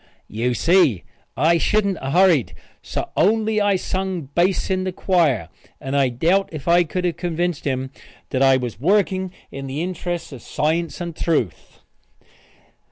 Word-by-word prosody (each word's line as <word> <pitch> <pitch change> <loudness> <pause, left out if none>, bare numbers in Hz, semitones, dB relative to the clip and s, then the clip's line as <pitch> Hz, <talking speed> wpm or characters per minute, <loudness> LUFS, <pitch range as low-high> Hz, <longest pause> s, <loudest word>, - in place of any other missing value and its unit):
You 120 +3 -1
see 165 - +3 0.3
I 165 +5 +3
shouldn't 200 -1 +1
a 135 - -3
hurried 175 - +3 0.3
so - - -5
only 220 +1 +2
I 205 -1 +3
sung 185 -5 -3
bass 185 +2 +1
in 185 0 0
the 185 - -2
choir 160 - +1 0.3
and 135 +1 -4
I 135 -2 +3
doubt 170 +11 +1
if 155 -2 -8
I 175 +1 +5
could 180 +2 -3
have 170 -2 -1
convinced 175 -2 -2
him 130 -1 -2 0.4
that 130 - 0
I 135 -1 +5
was 120 -4 -5
working 190 - +1 0.2
in 135 0 -6
the 140 +5 -3
interests 175 -2 -4
of 130 -4 -9
Science 165 +7 -1
and 170 -2 -5
Truth. 120 - -2
170 Hz, 160 wpm, -21 LUFS, 135-185 Hz, 0.4 s, I